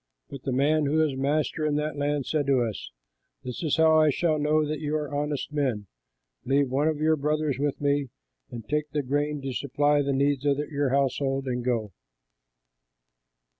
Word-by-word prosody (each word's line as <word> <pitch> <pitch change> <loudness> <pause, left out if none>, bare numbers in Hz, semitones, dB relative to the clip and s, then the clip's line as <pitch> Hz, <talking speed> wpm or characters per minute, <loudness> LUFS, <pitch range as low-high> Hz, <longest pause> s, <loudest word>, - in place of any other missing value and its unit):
But 140 - -7
the 135 - -3
man 145 +3 +2
who 155 +3 +1
is 140 -3 -2
master 150 +3 0
in 150 -1 +1
that 150 +1 -1
land 145 -1 -1
said 150 -3 -1
to 135 -3 +3
us, 110 -3 -5 0.5
'This 125 -1 -6
is 160 -3 0
how 160 -1 +5
I 155 - +4
shall 155 +1 +1
know 150 +1 +2
that 155 0 -3
you 150 0 -2
are 150 -2 -3
honest 145 0 -2
men: 130 -8 -1 0.6
leave 135 +1 +2
one 140 +4 +1
of 155 -2 0
your 155 +1 +3
brothers 150 -1 -1
with 145 -1 -1
me 145 -2 0 0.4
and 115 -3 -8
take 150 0 -1
the 145 0 -2
grain 145 +2 -1
to 135 -1 -3
supply 145 +3 +1
the 140 0 -1
needs 140 0 +1
of 140 -1 +2
your 145 -1 -1
households 135 0 0
and 125 -2 -2
go. 115 -4 -1
145 Hz, 190 wpm, -26 LUFS, 135-150 Hz, 0.6 s, how